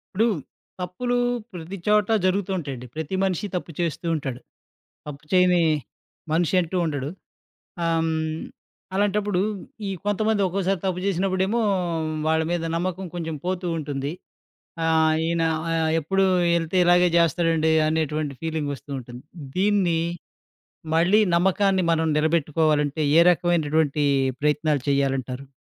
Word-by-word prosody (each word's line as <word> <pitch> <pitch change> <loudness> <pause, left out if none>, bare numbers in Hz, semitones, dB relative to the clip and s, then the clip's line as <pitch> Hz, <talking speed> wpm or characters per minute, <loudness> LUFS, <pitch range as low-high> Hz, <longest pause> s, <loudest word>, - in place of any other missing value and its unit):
ఇప్పుడు, 220 +4 +3 0.5
తప్పులు 185 +8 -2 0.4
ప్రతి 175 +2 -7
చోట 210 -1 +4 0.2
జరుగుతూంటాయండి. 180 -10 -2
ప్రతి 160 +4 -3
మనిషి 190 +1 -1
తప్పు 175 -1 -4
చేస్తూ 170 -1 -2
ఉంటాడు. 135 -5 -4 0.7
తప్పు 145 -1 -8
చేయని 180 -1 +4 0.7
మనిషి 170 +2 +1
అంటూ 175 +1 -3
ఉండడు. 145 -4 -2 0.8
ఆహ్‌, 165 0 +2
హ్మ్, 160 0 -2 0.5
అలాంటప్పుడు 205 -1 +1 0.5
ఈ - - -2 0.2
కొంతమంది 215 0 +1
ఒక్కోసారి 190 +1 0
తప్పు 185 -1 -1
చేసినప్పుడేమో, 190 +4 0 0.7
వాళ్ళ 160 0 +2
మీద 175 - -1
నమ్మకం 185 +2 -2
కొంచెం 160 -3 -4
పోతూ 185 0 -2
ఉంటుంది. 145 -1 -3 0.7
ఆహ్, 160 -1 +3
ఈయన 165 0 0 0.3
ఆహ్, 160 -1 +1
ఎప్పుడు 195 +5 +1 0.3
ఏళ్తే 165 +2 -1
ఇలాగే 175 0 +5
చేస్తాడండి 165 -1 +2
అనేటువంటి 155 -2 -1
ఫీలింగొస్తూ 150 -4 -4
ఉంటుంది. 120 0 -11 0.3
దీన్ని 190 -4 +2 1.0
మళ్ళీ 175 +6 +4 0.2
నమ్మకాన్ని 190 +1 +2
మనం 160 0 +1
నిలబెట్టుకోవాలంటే, 155 -1 +1
ఏ - - +8
రకమైనటువంటి 155 -4 +1 0.4
ప్రయత్నాలు 150 -1 +1
చేయాలంటారు? 135 -1 -1
165 Hz, 110 wpm, -24 LUFS, 155-185 Hz, 1.0 s, ఏ